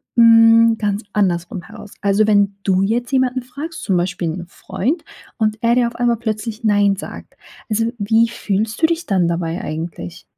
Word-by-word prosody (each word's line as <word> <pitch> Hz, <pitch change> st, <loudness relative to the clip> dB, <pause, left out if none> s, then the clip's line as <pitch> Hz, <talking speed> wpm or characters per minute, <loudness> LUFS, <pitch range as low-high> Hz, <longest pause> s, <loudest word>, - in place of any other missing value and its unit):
hm, 230 Hz, -1 st, +6 dB
ganz 205 Hz, 0 st, -2 dB
andersrum 180 Hz, -2 st, -1 dB
heraus? 200 Hz, -, -12 dB
Also, 205 Hz, +1 st, +2 dB
wenn 200 Hz, -2 st, +2 dB
du 190 Hz, -1 st, +2 dB
jetzt 240 Hz, +5 st, -1 dB
jemanden 260 Hz, -1 st, +1 dB
fragst, 290 Hz, +7 st, -8 dB
zum 190 Hz, -, +1 dB
Beispiel 175 Hz, -1 st, -2 dB
'n 175 Hz, +2 st, -5 dB
Freund, 240 Hz, -, -3 dB, 0.3 s
und 215 Hz, -1 st, 0 dB
er 235 Hz, 0 st, +3 dB
dir 245 Hz, -1 st, +3 dB
auf 235 Hz, -, -7 dB
einmal 240 Hz, -1 st, +1 dB
plötzlich 220 Hz, 0 st, -4 dB
nein 205 Hz, -2 st, +3 dB
sagt. 195 Hz, -, -10 dB, 0.3 s
Also, 225 Hz, +1 st, 0 dB
wie 225 Hz, +2 st, +2 dB
fühlst 215 Hz, +3 st, -3 dB
du -, -, +6 dB
dich 335 Hz, +1 st, -1 dB
dann 185 Hz, -5 st, +2 dB
dabei 170 Hz, 0 st, -2 dB
eigentlich? 155 Hz, -, -6 dB
215 Hz, 175 wpm, -19 LUFS, 190-235 Hz, 0.3 s, hm